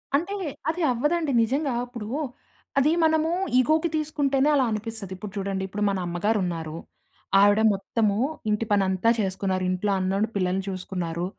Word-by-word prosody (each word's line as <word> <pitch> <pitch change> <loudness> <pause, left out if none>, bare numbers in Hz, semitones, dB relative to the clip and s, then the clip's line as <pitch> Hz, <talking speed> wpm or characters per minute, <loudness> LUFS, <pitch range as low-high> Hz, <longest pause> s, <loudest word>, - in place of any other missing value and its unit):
అంటే 350 +8 0 0.4
అది 340 +2 -2
అవ్వదండి. 295 +5 0
నిజంగా 275 +3 0
ఇప్పుడూ, 235 -4 -7 0.7
అదీ 290 +3 +3
మనము 315 +1 +2 0.3
ఇగోకి 310 +6 +2
తీసుకుంటేనే 290 -2 +1
అలా 265 - +3
అనిపిస్తది. 215 -3 -4
ఇప్పుడు 195 +1 -7
చూడండి. 195 -1 -2
ఇప్పుడు 205 +2 -3
మన 195 - -1
అమ్మగారు 205 +6 0
ఉన్నారు. 165 -2 -4 0.6
ఆవిడ 205 +2 +5
మొత్తము, 200 +1 0 0.3
ఇంటి 210 +2 0
పని 200 -1 +4
అంతా 190 +4 +2
చేసుకున్నారు. 190 -1 -1
ఇంట్లో 185 +3 0
అన్నోండి 195 +4 0
పిల్లల్ని 190 0 0
చూసుకున్నారు. 180 -2 -3
210 Hz, 140 wpm, -25 LUFS, 190-275 Hz, 0.7 s, ఆవిడ